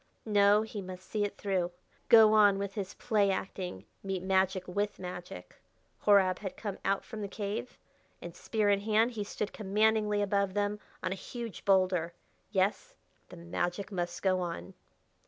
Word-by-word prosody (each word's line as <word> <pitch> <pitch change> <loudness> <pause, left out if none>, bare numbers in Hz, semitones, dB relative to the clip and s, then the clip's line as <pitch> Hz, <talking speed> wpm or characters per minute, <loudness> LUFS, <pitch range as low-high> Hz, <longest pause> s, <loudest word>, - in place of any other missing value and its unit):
No, 205 0 +4
he 220 -2 -6
must 185 0 -9
see 210 -1 -1
it 205 - -3
through 185 -3 0 0.4
go 220 -2 +8
on 205 -2 +6
with 200 0 -3
his 195 -2 -5
play 210 -4 +2
acting 185 - -4 0.2
meet 190 -2 -3
magic 190 -1 +1
with 205 +3 -2
magic. 180 - -8 0.5
Horab 195 -3 +5
had 195 -3 -6
come 205 -3 -5
out 195 0 0
from 220 -3 -7
the 200 - -3
cave, 205 +4 -5 0.4
and 175 0 -9
spear 215 +2 -1
in 200 - +3
hand 220 +3 +2
he 215 -3 -3
stood 205 +1 -4
commandingly 210 0 +2
above 200 -1 0
them 205 0 0 0.2
on - - -1
a 190 - -6
huge 235 -4 -6
boulder. 185 -3 +2 0.4
Yes, 205 - 0 0.3
the 180 - -11
magic 175 +3 -3
must 175 -2 -3
go 185 -1 +3
on. 175 +2 -5
200 Hz, 165 wpm, -31 LUFS, 185-210 Hz, 0.5 s, go